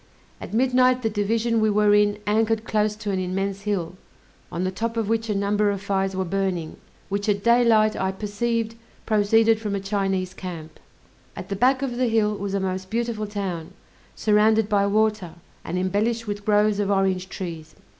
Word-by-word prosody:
At - - -7
midnight 255 +1 +3
the 225 - 0
division 225 +2 0
we 215 - +3
were 210 0 +3
in 205 0 +3
anchored 220 +1 +1
close 215 -1 0
to 210 -1 -4
an 190 - -1
immense 195 +2 -2
hill, 180 -3 -2 0.5
on 175 - -3
the 185 - -1
top 230 +4 -3
of 225 -3 0
which 225 0 -1
a 210 - 0
number 205 +1 +1
of 200 -1 -2
fires 195 -1 -1
were 190 0 -1
burning, 185 -3 -2 0.3
which 200 +2 -2
at 200 -1 0
daylight 230 -2 +4
I 190 0 -1
perceived 225 +3 -2 0.3
proceeded 220 +1 +3
from 210 -2 -2
a - - -1
Chinese 195 -2 -1
camp. 165 -5 -8 0.6
At - - -8
the 200 - -2
back 255 +6 +2
of 245 -3 -3
the 255 0 +1
hill 220 -2 +2
was 200 -1 -4
a - - +1
most 190 0 -3
beautiful 230 -2 -2
town, 185 -4 -5 0.4
surrounded 215 0 +3
by 200 -1 +2
water, 215 -4 0 0.3
and 175 - -4
embellished 210 +5 0
with 205 -1 -5
groves 210 -1 +3
of 200 -1 0
orange 190 -2 +1
trees. 165 -5 -7
205 Hz, 185 wpm, -24 LUFS, 195-220 Hz, 0.6 s, daylight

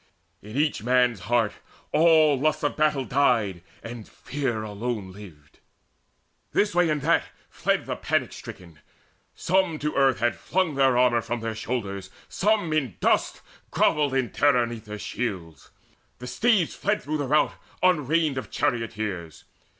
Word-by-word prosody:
In 105 +5 -8
each 150 -6 +1
man's 125 -1 +2
heart 115 -3 +2 0.4
all 160 -2 +5
lust 155 +2 0
of 145 - 0
battle 150 -3 +1
died, 115 -10 +1 0.2
And 115 -2 -8
fear 130 -6 -3
alone 105 -1 -4
lived. 90 -8 -14 0.9
This 205 0 +2
way, 175 0 +3
that 150 -2 -2
way 165 - +3 0.3
fled - - 0
The - - -3
panic - - -1
stricken: 85 -4 -11 0.6
some 185 -3 +1
to 150 0 -2
earth 135 -2 +3
had 120 +1 +1
flung 185 -4 -1
The 135 - -1
armour 125 -2 +3
from 120 +1 -4
their 115 0 -3
shoulders; 100 -4 -4 0.2
some 205 -5 +1
in 135 - -1
dust - - +1 0.3
Grovelled 145 -3 +2
in 130 -3 0
terror 135 -4 +3
'neath 115 -1 -8
their 105 0 -7
shields: 90 - -5 0.5
the 125 - -9
steeds 205 - +2
Fled 210 +1 -1
through 155 +2 -2
the 145 -2 -2
rout 150 +3 +3 0.3
unreined 155 -4 +2
of - - -9
charioteers. 110 - -3
125 Hz, 150 wpm, -25 LUFS, 110-150 Hz, 0.9 s, all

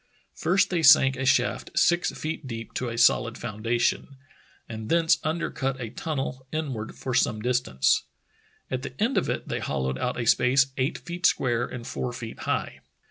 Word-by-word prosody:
First 185 +3 +1
they 175 -2 +1
sank 135 -3 +7
a 130 0 -2
shaft 135 - +1
six 175 0 +3
feet 155 -2 -5
deep 115 -2 -7
to 125 - -2
a 115 - -5
solid 115 0 +3
foundation, 115 +5 -1 0.5
and 110 -1 -7
thence 165 -1 +3
under 160 +2 -1
cut 135 0 -2
a 115 -4 -5
tunnel 135 -2 -4
inward 135 -9 -4
for 130 - -5
some 110 -2 +2
distance. 120 - +1 0.7
At 130 -1 -2
the 130 0 -8
end 235 +5 +1
of - - +1
it - - -3
they - - -2
hollowed 65 0 -2
out 125 - -2
a 120 - -2
space 130 +4 +3
eight 130 +4 -1
feet 175 +1 0
square 120 -2 +1
and 125 -2 -8
four 125 -1 -3
feet 115 -2 -8
high. - - -2
130 Hz, 180 wpm, -26 LUFS, 115-150 Hz, 0.7 s, sank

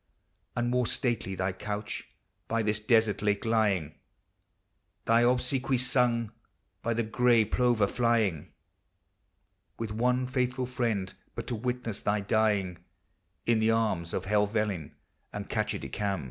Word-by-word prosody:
And 120 0 0
more 125 -1 +2
stately 115 -6 0
thy 95 0 -1
couch 105 +2 -5 0.4
by 115 0 0
this 105 0 +1
desert 110 -1 +2
lake 105 0 0
lying, 105 -9 +1 1.1
Thy 115 +1 +4
obsequies 125 +1 +2
sung 120 -4 +2 0.5
by 115 0 -1
the 115 - +1
gray 115 0 +3
plover 120 -1 +2
flying, 110 -7 +1 1.3
With 115 -2 -4
one 125 +3 +1
faithful 125 0 -1
friend 115 -7 -1 0.2
but - - -4
to 120 - -2
witness 120 -2 -3
thy 105 +1 +1
dying, 100 -4 +1 0.7
In 115 -1 +3
the 110 0 +3
arms 110 -7 +1
of 95 - -3
Helvellyn 105 -4 0 0.4
and - - -6
Catchedicam. 95 +8 -2
110 Hz, 125 wpm, -29 LUFS, 105-120 Hz, 1.3 s, Thy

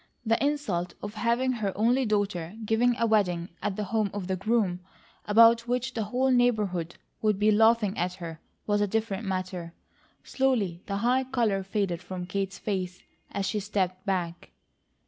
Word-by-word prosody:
The 225 +3 +2
insult 210 -13 -1
of 205 0 -5
having 235 +4 +1
her 215 -5 -1
only 240 +4 +3
daughter 205 -4 -1
given 235 +3 +3
a 230 - +2
wedding 180 -6 +1
at 200 -1 -1
the 210 - -2
home 215 0 0
of 200 -3 -3
the 190 +1 -1
groom, 195 -2 +1 0.5
about 230 +2 +6
which 250 +1 -1
the 220 -2 -2
whole 255 +5 +1
neighbourhood 210 -9 +1 0.3
would 215 -2 +2
be 210 +1 +4
laughing 220 -1 +4
at 180 +1 -1
her, 165 -3 -7 0.3
was 205 -1 +1
a 205 - +2
different 215 0 -2
matter. 185 -3 -4 0.5
Slowly 220 -10 0
the 200 - -2
high 260 +2 +3
colour 230 -7 +1
faded 190 -3 -2
from 180 0 -6
Kate's 195 +1 -3
face, 185 -3 -3 0.3
as 200 - -2
she 210 - -1
stepped 190 -2 -2
back. 175 -3 -2
205 Hz, 165 wpm, -28 LUFS, 185-230 Hz, 0.5 s, about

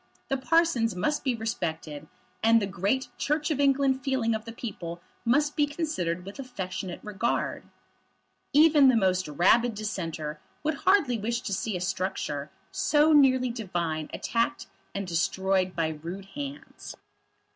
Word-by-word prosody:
The 270 - +1
parsons 265 - +2
must 295 +12 0
be 260 -3 +1
respected, 165 -9 -4 0.3
and 230 +1 +5
the 205 - -1
great 200 +8 -1
Church 300 +2 0
of 290 - -1
England 275 -1 +3
feeling 260 -5 +1
of 220 0 -3
the 230 - -6
people 175 -8 -6 0.3
must 290 +5 +2
be 295 -2 +3
considered 185 - -2
with 200 +7 -9
affectionate 185 -7 -5
regard. 210 +2 -2 0.9
Even 300 -2 +6
the 255 - +5
most 185 -4 +2
rabid 210 +10 +3
Dissenter 165 -8 -4 0.2
would 310 +1 +1 0.2
hardly 285 - +4
wish 235 +3 -1
to 200 - -3
see 190 0 -1
a - - -6
structure 180 -6 -2 0.2
so 300 +1 +3
nearly 260 -4 +5
divine 170 -9 -3
attacked 235 +5 -1 0.3
and 200 0 -2
destroyed 185 +2 0
by 165 -2 +1
rude 185 +4 -6
hands. 285 0 -7
225 Hz, 145 wpm, -27 LUFS, 185-275 Hz, 0.9 s, Even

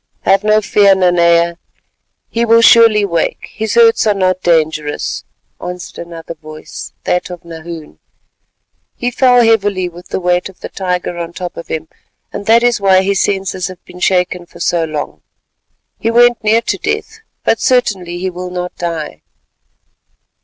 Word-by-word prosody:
"Have 195 +1 +3
no 215 0 +3
fear, 200 -1 +4
Nanea, 170 -2 +3 0.7
he 230 - -1
will 230 0 +5
surely 225 -3 +6
wake, 170 -4 -2
his 220 0 -3
hurts 230 -1 +5
are 210 - +3
not 185 -1 0
dangerous," 155 -3 0 0.4
answered 180 -1 -7
another 165 -1 -8
voice, 155 -1 -10
that 180 - -1
of 175 -1 -9
Nahoon. 165 -1 -9 1.0
"He 245 +1 -2
fell 250 -1 +4
heavily 205 -5 +2
with 175 +1 -13
the - - -3
weight 180 +1 0
of 190 - -18
the - - -6
tiger 180 -2 -3
on 170 0 -5
top 175 0 -6
of 170 - -8
him, 160 0 -4 0.5
and 205 - -6
that 230 +1 +5
is 240 -3 +2
why 190 -1 +4
his 195 0 +1
senses 190 -2 -1
have 185 -2 -11
been 180 - -13
shaken 180 -1 0
for - - -16
so 170 -2 +1
long. 155 -2 -5 0.8
He 225 - 0
went 240 0 +4
near 220 +2 +3
to - - -2
death, 445 0 -3 0.2
but - - +2
certainly 195 -9 0
he 185 +1 -3
will 180 +1 -6
not 180 0 -5
die." 160 - -4
185 Hz, 160 wpm, -15 LUFS, 170-215 Hz, 1.0 s, surely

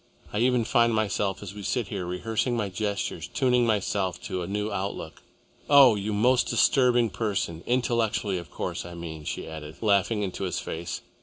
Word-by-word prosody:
I 105 - 0
even 125 0 +3
find 115 0 +3
myself, 100 -2 -1
as 100 -1 -7
we 105 - -8
sit 110 +2 -1
here, 95 -4 -4
rehearsing 110 +7 -1
my 105 -3 -1
gestures, 100 +2 -3
tuning 125 -2 +2
myself 100 -4 0
to 90 - -3
a 85 - -4
new 105 +2 -2
outlook. 100 0 -4 0.5
Oh! 140 -4 +8
You 105 +1 -2
most 125 +5 +3
disturbing 120 -1 +3
person 100 -7 -2
intellectually 115 -6 +1
of 85 -3 -10
course, - - -4
I 85 0 -9
mean," 80 -3 -7
she - - -4
added, 80 -1 -8
laughing 105 0 +2
into 95 0 -3
his 90 - -2
face. 85 +2 -4
105 Hz, 175 wpm, -27 LUFS, 95-115 Hz, 0.5 s, Oh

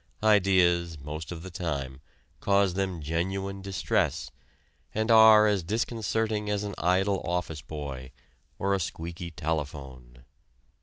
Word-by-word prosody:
Ideas, 90 -5 +3
most 75 +3 -7
of 85 -1 -7
the 95 - -8
time, 70 -6 -4 0.4
cause 100 -2 +2
them 95 -4 -2
genuine 95 +5 -2
distress, 95 -1 -1 0.6
and 110 +2 +1
are 110 -1 +8
as 105 -3 +2
disconcerting 110 +1 -1
as 105 0 -1
an 100 -1 -4
idle 95 +3 +2
office 85 -3 -3
boy, 70 -5 -7 0.5
or 100 +1 0
a 100 - +1
squeaky 85 +1 -5
telephone. 70 -6 -5
90 Hz, 120 wpm, -28 LUFS, 80-100 Hz, 0.6 s, are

